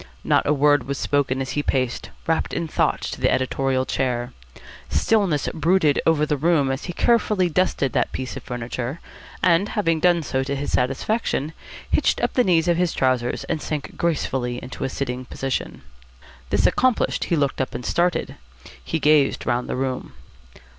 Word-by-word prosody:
Not - - +2
a - - +3
word 145 -2 +3
was 140 0 -2
spoken 135 -2 0
as 130 - -6
he 145 - 0
paced, 130 -4 -1 0.2
wrapped 165 0 0
in 170 - -2
thought, - - 0
to - - -5
the - - +3
editorial 130 0 0
chair. 125 -2 -1 0.6
Stillness 195 -10 +1
brooded 160 -2 +2
over 155 -2 +3
the 150 -1 0
room 145 -2 +2
as 135 - -4
he 175 - -5
carefully 210 -4 +2
dusted 165 -5 0
that - - +1
piece 130 -1 -5
of - - -6
furniture, 125 +4 -5 0.4
and, 180 +4 +3
having 165 -6 +1
done 175 -1 +3
so 130 -2 -1
to 140 +1 -2
his 140 +1 -3
satisfaction, 145 - 0 0.4
hitched - - +2
up - - 0
the 250 - +3
knees 170 -4 +3
of 170 -1 +3
his 175 -1 +1
trousers 130 -2 0
and 160 -3 -3
sank 150 -2 -4
gracefully 130 -7 -1
into 125 - -6
a 135 - -1
sitting 130 -2 -3
position. 135 +1 -4 0.7
This - - +2
accomplished, 255 -3 +2
he 170 - +1
looked 140 -3 0
up 130 - -3
and 125 - -5
started. 175 0 0 0.5
He - - -2
gazed 150 -2 +3
round 120 +1 -1
the - - -1
room. 130 0 -3
145 Hz, 175 wpm, -23 LUFS, 130-170 Hz, 0.7 s, a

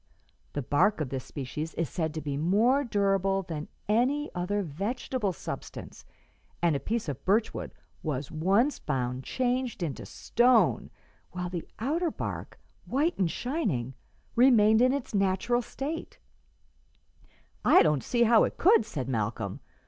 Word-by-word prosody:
The 145 - -2
bark 175 - +2
of 150 -5 -2
this 130 -1 -4
species 150 +3 -5
is 165 - -1
said 160 +4 -2
to 155 - -3
be 145 -1 -3
more 215 - +3
durable 195 -4 +1
than 155 -4 -5 0.2
any 260 +8 +1
other 200 +3 -1
vegetable 205 - -2
substance, 165 - -8 0.5
and 170 -3 +2
a - - 0
piece 225 +3 -2
of 140 -4 -5
birch 215 +4 +2
wood - - -5 0.3
was 145 -3 -3
once 195 - +2
found 130 -2 -2
changed 250 - -1
into 150 -5 -4
stone, 240 0 +2 0.4
while 180 -1 -4
the 175 -3 -5
outer 320 +9 0
bark, - - -6 0.3
white 300 +7 +1
and 185 -3 +2
shining, 180 - -2 0.4
remained 225 -3 +6
in 255 +1 +5
its 275 -4 -3
natural 195 +5 +1
state," 290 +7 -5 1.5
"I - - +7
don't 150 -4 +2
see 240 -1 +2
how 230 -1 +6
it - - -2
could," 360 - +5
said 130 - -4
Malcolm. 110 -4 -2
195 Hz, 145 wpm, -28 LUFS, 150-245 Hz, 1.5 s, I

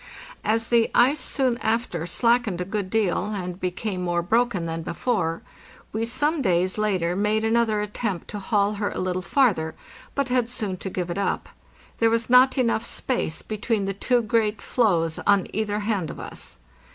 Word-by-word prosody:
As 225 +1 +1
the 235 -1 +4
ice 270 +5 +5
soon 255 -2 0
after 220 -7 -1
slackened 235 -1 +2
a 180 - -2
good 195 0 -3
deal, 205 -4 +1
and 180 -2 -5
became 185 +1 -3
more 175 -1 0
broken 225 -2 +1
than 165 0 -3
before, 170 -2 -1 0.5
we 220 +2 -1
some 295 +6 +1
days 185 -2 +1
later 185 -5 +1
made 210 +2 +1
another 225 -1 +2
attempt 210 -3 -3
to 210 - -5
haul 205 0 +1
her 205 - +1
a - - -6
little 185 0 -1
farther, 190 - +1 0.4
but 280 -2 0
had 250 -2 +1
soon 210 -7 -3
to 190 - -5
give 180 -2 -3
it 180 - -3
up; 200 - -1 0.5
there 230 - +4
was 230 +1 0
not 255 +2 +6
enough 230 -3 +1
space 240 -11 -2
between 215 -1 -1
the 195 - -2
two 240 +4 +1
great 215 -1 +1
floes 170 -9 +1
on 200 -2 +4
either 210 0 -1
hand 205 -6 -1
of - - -8
us. - - -7
210 Hz, 175 wpm, -24 LUFS, 185-235 Hz, 0.5 s, not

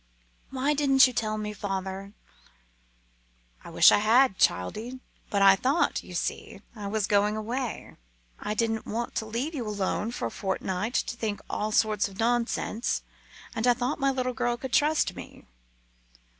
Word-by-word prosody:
"Why 270 +3 0
didn't 275 -2 +5
you 255 - -1
tell 215 -2 -1
me, 210 0 -4
father?" 195 0 -5 1.5
"I - - -10
wish - - +7
I - - +4
had, 225 0 +4
childie; 220 - 0 0.3
but 200 -1 +2
I 195 0 +8
thought 275 - +1
you - - -10
see - - -4
I 205 -2 -6
was 210 0 0
going 205 +1 +2
away 235 +2 -4 0.4
I 210 - -3
didn't 225 -1 -1
want 235 +2 -3
to 220 - -2
leave 245 +9 -3
you 250 -7 -4
alone 205 +1 -1
for 240 - -4
a 115 - -3
fortnight 190 +3 -3
to - - 0
think 220 -3 -3
all 215 +1 -2
sorts 215 -1 +2
of 195 -1 -13
nonsense. 235 0 0 0.5
And 230 +1 -1
I 245 - +5
thought 250 +5 -2
my 275 -1 +2
little 255 -1 -1
girl 240 -1 -1
could 260 +1 -7
trust 305 +1 +2
me." - - -11
225 Hz, 165 wpm, -27 LUFS, 205-255 Hz, 1.5 s, I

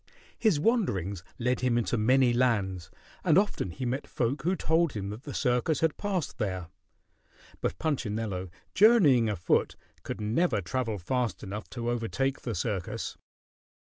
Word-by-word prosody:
His 215 -10 +3
wanderings 100 - 0
led 125 +1 0
him 125 -2 +1
into 120 +1 0
many 125 +3 +4
lands, 100 -8 +1 0.3
and 165 -2 +4
often 200 - +1
he 125 +10 -5
met 130 +3 -2
folk 130 +4 -1
who 180 +6 +1
told 165 -3 +2
him 100 -1 -4
that 110 +7 -9
the 145 - -6
circus 125 +5 +1
had 160 -2 +2
passed 195 -7 -3
there. 95 -5 -2 0.9
But 85 - -1
Punchinello, 110 - -2 0.2
journeying 165 - +6
afoot, 90 -5 +1 0.3
could - - -5
never 110 +3 +1
travel 110 +3 -2
fast 120 +6 -2
enough 105 +2 -6
to 120 -1 -3
overtake 130 +3 -1
the 115 -4 -3
circus. 105 -8 -3
120 Hz, 145 wpm, -29 LUFS, 105-145 Hz, 0.9 s, journeying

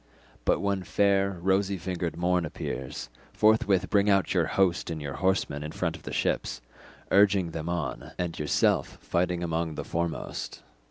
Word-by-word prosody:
But - - +2
when 100 -1 0
fair 100 0 +2
rosy 95 +1 +2
fingered 90 -1 -3
morn 90 0 +2
appears, 65 -5 -5 0.2
forthwith 105 -4 +3
bring 100 0 +4
out 100 -3 +3
your - - +2
host 95 -4 +1
and 80 -1 -3
your 70 -2 -5
horsemen 95 -6 0
in 75 +1 -5
front - - -1
of - - -12
the - - -7
ships, - - -1 0.5
urging 95 -3 +4
them 80 +1 -4
on, 85 0 -3
and 90 -2 -3
yourself 75 -1 +1
fighting 90 0 0
among 80 -1 -1
the - - -5
foremost." 85 0 -3
90 Hz, 160 wpm, -28 LUFS, 85-95 Hz, 0.5 s, bring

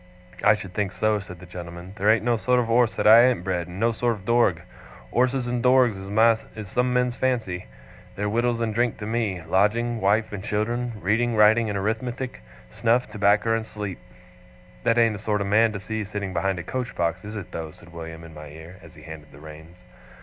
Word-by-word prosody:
'I 105 0 +6
should 100 -3 -9
think 100 -2 -2
so,' 110 -1 +1
said 90 -3 -10
the 90 - -12
gentleman. 90 +1 -9
'There 105 +1 +1
ain't 110 0 +3
no 120 -1 +3
sort 125 +3 +1
of 115 -2 -1
orse 120 -1 +3
that - - -2
I 115 +3 +9
ain't 125 -8 0
bred, 90 -2 -2
and 90 +2 -9
no 115 +2 +2
sort 120 +1 0
of 100 -2 -14
dorg. 115 -8 +2 0.5
Orses 125 +1 +1
and 120 0 -2
dorgs 125 -2 +4 0.6
is 110 -2 -7
some 125 +3 0
men's 125 -1 +1
fancy. 115 - -2 0.5
They're 105 +1 -2
wittles 120 +2 0
and 110 -2 -1
drink 120 +1 0
to 105 - -6
me 105 -6 -2
lodging, 110 +7 +1
wife, 105 +3 +1
and 100 -1 -5
children 120 +4 -2
reading, 110 +5 +1
writing, 110 +1 +5
and 100 - -2
Arithmetic 115 - -3 0.3
snuff, 120 - +1
tobacker, 105 +2 +2
and 115 - -2
sleep.' 105 -4 -6 0.8
'That 115 - +2
ain't 115 -3 +3
a - - -11
sort 105 0 -1
of 100 - -2
man 110 +3 +3
to 100 - -4
see 110 +3 -4
sitting 100 -2 -5
behind 95 +2 0
a 85 - -5
coach 125 +6 -4
box, 85 +1 -1
is 105 +1 -7
it 100 -4 -7
though?' 80 -1 -5
said 85 +2 -17
William 80 -1 -8
in 80 -1 -12
my 75 0 -10
ear, 80 +5 -12
as - - -15
he 75 - -14
handled 80 -2 -11
the 70 - -15
reins. 80 +4 -13
105 Hz, 215 wpm, -24 LUFS, 90-115 Hz, 0.8 s, I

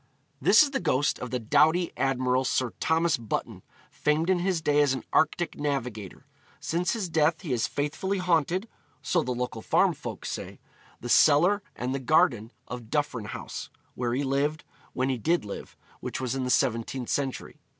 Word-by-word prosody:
This - - +7
is 285 - -2
the 270 - -1
ghost 145 -4 +1
of 125 - -5
the 125 - -1
doughty 150 +9 +3
admiral 130 0 +1
Sir 130 -1 0
Thomas 160 -1 +2
Button, 115 -3 -4 0.3
famed 155 +4 +1
in 185 - +2
his 180 -1 0
day 150 -2 +2
as 145 -2 +3
an 130 - -6
Arctic 170 +1 +1
navigator. 125 -9 -4 0.3
Since 175 +2 -1
his 215 -5 -2
death 160 0 +2
he 165 -7 -5
has 125 0 +1
faithfully 150 +9 -2
haunted 180 +2 +1 0.4
(so 175 - +2
the 125 - -3
local 125 -2 -3
farm - - +3
folk - - -7
say) - - -6 0.4
the 120 - -5
cellar 165 - +5
and 125 +2 -3
the 135 - -2
garden 130 - +2 0.2
of 120 -3 -7
Duffryn 145 -7 -1
House, - - -6 0.2
where 120 -1 -2
he 140 - 0
lived, 140 +3 0 0.3
when 130 +1 0
he 130 -2 -1
did 165 +2 +1
live, 100 - -8 0.2
which - - -5
was 130 -2 -2
in 135 -1 -2
the - - -2
17th 120 +1 0
century. 135 -2 -3
145 Hz, 180 wpm, -27 LUFS, 125-165 Hz, 0.4 s, This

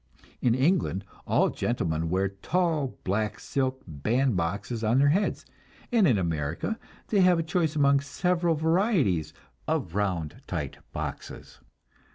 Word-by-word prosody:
In 120 -2 +3
England 130 - +1 0.2
all - - +3
gentlemen 80 -9 -1
wear 95 +2 +1
tall 155 - -1
black 105 +3 -1
silk 130 -1 -2
band 110 - 0
boxes 100 +7 -2
on 110 +3 +3
their 140 +1 +5
heads, 195 +8 0 0.5
and 225 -6 +5
in 120 -7 +4
America 85 - -2 0.3
they 205 -3 +3
have 180 -1 +5
a 165 - 0
choice 160 -1 0
among 140 -1 +4
several 170 +3 0
varieties 160 - +2 0.4
of 80 - -1
round 90 -6 -2
tight - - -4
boxes. - - -6
130 Hz, 135 wpm, -27 LUFS, -, 0.5 s, their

